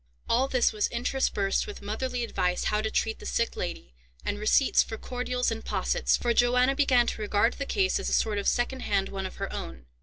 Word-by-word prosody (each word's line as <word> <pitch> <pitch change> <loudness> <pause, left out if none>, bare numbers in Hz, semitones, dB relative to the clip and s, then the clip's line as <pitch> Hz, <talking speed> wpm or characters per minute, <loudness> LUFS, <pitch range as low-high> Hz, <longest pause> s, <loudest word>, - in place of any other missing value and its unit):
All 255 +3 +2
this 255 -3 +2
was 210 -1 +1
interspersed 235 - 0
with 415 - -8
motherly 245 +4 -2
advice 180 -5 -1
how 210 0 +1
to 220 - -1
treat 220 0 -1
the - - -11
sick 235 - 0
lady, 65 0 -5 0.3
and 205 - -2
receipts 215 +6 +4
for 220 - -4
cordials 250 0 -2
and 225 0 -4
possets; - - +1
for 240 -1 0
Johanna 250 +3 +3
began 260 -4 +4
to 225 - -3
regard 210 +3 +2
the 280 - -5
case 385 -2 +1
as - - -2
a - - -2
sort 210 -2 +1
of 200 - -3
second 255 +2 +1
hand 200 -5 0
one 195 -1 -4
of - - -11
her - - -5
own. 65 -1 -7
235 Hz, 215 wpm, -27 LUFS, 205-250 Hz, 0.3 s, receipts